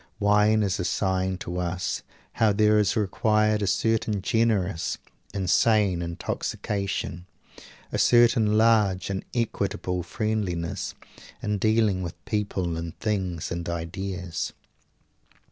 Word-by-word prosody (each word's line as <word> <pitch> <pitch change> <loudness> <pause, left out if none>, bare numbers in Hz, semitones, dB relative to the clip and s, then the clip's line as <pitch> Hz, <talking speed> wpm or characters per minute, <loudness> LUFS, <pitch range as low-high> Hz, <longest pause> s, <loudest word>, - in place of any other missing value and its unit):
Wine 105 +1 +4
is 100 -2 0
a - - 0
sign 95 0 0
to 90 0 -4
us 90 +1 -2 0.3
how 110 -2 +3
there 105 +1 +4
is 105 - +2
required 105 +1 +2
a 100 - 0
certain 105 0 +1
generous 105 -7 +1 0.3
and 95 -2 -3
sane 105 -3 +3
intoxication, 90 +1 -3 0.6
a - - -1
certain 115 -3 +5
large 105 -4 +3
and 95 - -3
equable 100 -5 -1
friendliness 95 -5 -2 0.5
in 105 -1 -1
dealing 110 -3 +2
with 85 0 -5
people 95 -5 -1
and 85 0 -6
things 95 -6 -2
and 85 0 -3
ideas. 90 0 -4
100 Hz, 115 wpm, -26 LUFS, 90-110 Hz, 0.6 s, certain